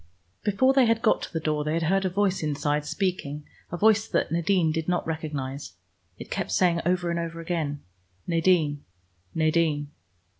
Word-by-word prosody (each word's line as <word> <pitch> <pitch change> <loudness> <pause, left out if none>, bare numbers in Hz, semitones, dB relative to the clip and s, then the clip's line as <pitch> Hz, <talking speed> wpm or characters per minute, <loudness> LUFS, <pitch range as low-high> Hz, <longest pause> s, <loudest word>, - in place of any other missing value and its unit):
Before 240 +6 +3
they 265 -3 +5
had 230 0 +1
got 215 - +3
to - - -6
the 165 - -2
door 155 -1 -1
they 155 +1 -1
had 165 - 0
heard 190 +4 +2
a - - +2
voice 195 0 0
inside 150 -1 -1
speaking, 150 -7 -2 0.3
a 175 - -3
voice 220 +2 +4
that - - 0
Nadine 170 0 +2
did 160 0 -2
not 180 0 0
recognize. 145 - -4 0.4
It - - -10
kept - - -2
saying 175 -2 +3
over 175 -1 +1
and 170 - -1
over 165 0 -4
again, 160 -4 -3 0.4
"Nadine, 165 -4 +2 0.5
Nadine." 155 -2 +1
165 Hz, 175 wpm, -26 LUFS, 150-185 Hz, 0.5 s, they